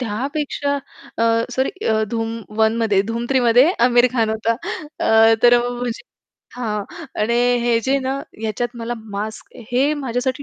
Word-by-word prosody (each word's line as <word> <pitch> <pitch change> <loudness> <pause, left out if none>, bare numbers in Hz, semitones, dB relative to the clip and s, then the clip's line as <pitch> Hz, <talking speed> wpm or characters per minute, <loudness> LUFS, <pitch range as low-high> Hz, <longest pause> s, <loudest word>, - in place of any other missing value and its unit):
त्यापेक्षा 280 +5 -2 0.4
अ, - - +1 0.3
सॉरी 260 +1 0 0.4
धूम 230 0 -3 0.2
1 220 0 +3
मध्ये 220 -4 +2
धूम 235 +1 -3
3 260 -1 +3
मध्ये 245 +6 +5 0.2
आमिर 245 0 +5
खान 225 -3 +1
होता. 220 +1 0 0.5
अ, 225 0 +5
तर 240 0 +7
म्हणजे 245 -1 -4 0.5
हां. 210 -4 -3 0.4
आणि 230 +3 +1 0.3
हे 235 -1 +3
जे 270 +4 +1
ना 270 +1 -2 0.2
ह्याच्यात 235 +3 -3
मला 235 +1 -4 0.2
मास्क 215 +2 -6 0.2
हे 275 +5 +3
माझ्यासाठी 260 +2 -2
240 Hz, 145 wpm, -20 LUFS, 225-255 Hz, 0.5 s, तर